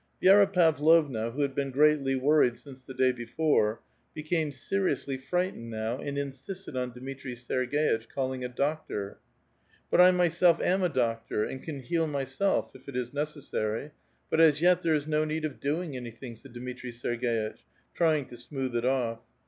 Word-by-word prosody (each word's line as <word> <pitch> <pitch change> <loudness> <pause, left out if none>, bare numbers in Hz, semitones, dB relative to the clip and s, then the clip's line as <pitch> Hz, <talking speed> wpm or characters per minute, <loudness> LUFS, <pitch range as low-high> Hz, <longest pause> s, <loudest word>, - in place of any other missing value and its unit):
Jj^ra 195 +1 +6
Pavlovna, 155 - +3
who 135 +5 -4
had 140 -1 -1
been 140 0 -1
greatly 140 0 +3
worried 130 -2 +3
since 135 -2 -13
the 130 0 -11
day 130 0 +3
^^ore, 120 -2 +1 0.4
became 155 0 -1
seriously 140 0 -1
frightened 135 -2 -2
now 110 +3 -3
and 140 0 -4
insisted 140 +5 -6
on 125 -1 -2
^^itri 130 +1 -7
Serg^itch 125 0 0
calling 130 -1 -3
a 125 - -3
doctor. 130 -7 -3 0.7
But - - +6
I 180 - +9
myself 175 -1 +3
am 190 +2 +1
a 180 - +2
doctor, 115 -5 -1
and 130 - -5
can 145 -4 -6
heal 165 +6 0
myself, 140 +6 -1
if 130 +1 -12
it 135 - -8
is 125 -1 -2
'^^pessary; 145 -4 -3 0.4
but, 160 - +4
as 155 -2 +6
yet, 180 +1 +4
there 165 -2 +2
is 145 -1 -1
no 155 0 +1
need 155 +1 -2
of 150 - -5
doing 150 +1 -2
anything," 120 0 -7
?J*^ 135 +5 -15
Dmitri 125 +1 -7
Ser^^itch, 120 -2 -2 0.4
trying 155 -4 +2
to 120 - -11
smooth 130 0 -4
it 120 +1 0
off. 125 -3 0
135 Hz, 170 wpm, -28 LUFS, 125-155 Hz, 0.7 s, I